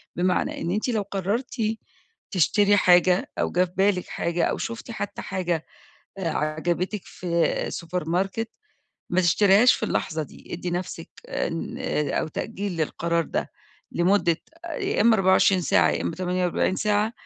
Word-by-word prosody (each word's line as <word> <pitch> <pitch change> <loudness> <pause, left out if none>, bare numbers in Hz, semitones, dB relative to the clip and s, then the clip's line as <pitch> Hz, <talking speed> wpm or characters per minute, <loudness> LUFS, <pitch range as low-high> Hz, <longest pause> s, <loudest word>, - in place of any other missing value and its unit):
بمعنى 180 +1 0
إن 170 - -1
أنتِ 210 +6 -1
لو 220 -3 +1
قررتِ 200 +6 -3 0.8
تشتري 205 +3 +4
حاجة، 180 -1 +4
أو - - 0
جه 180 +1 +3
في 175 - -14
بالِك 190 -2 +2
حاجة، 170 0 -1
أو - - -1
شفتِ 230 +1 -5
حتى 205 -3 -5
حاجة، 175 -4 -2 0.5
آآ، 185 -4 -1
عجبتِك 170 +6 -1
في 170 -2 -1
سوبر 170 -1 -4
ماركت، 195 +6 -1 0.6
ما 180 - +3
تشتريهاش 200 +6 +5
في - - -7
اللحظة 160 -6 -1
دي، 145 - -12
إدي 175 +1 -4
نفسِك 175 -1 -4 0.2
إن 165 - -3
آآ 150 -1 -1
أو - - -3
تأجيل 200 +2 -4
للقرار 170 +1 0
ده - - -3 0.4
لمدة 175 -1 +3 0.3
يا 320 - -2
إما 225 +1 +6
24 190 0 +4
ساعة، 175 - +3
يا - - -1
إما 165 - -3
48 180 0 0
ساعة، 210 +1 +1
180 Hz, 150 wpm, -25 LUFS, 170-205 Hz, 0.8 s, إما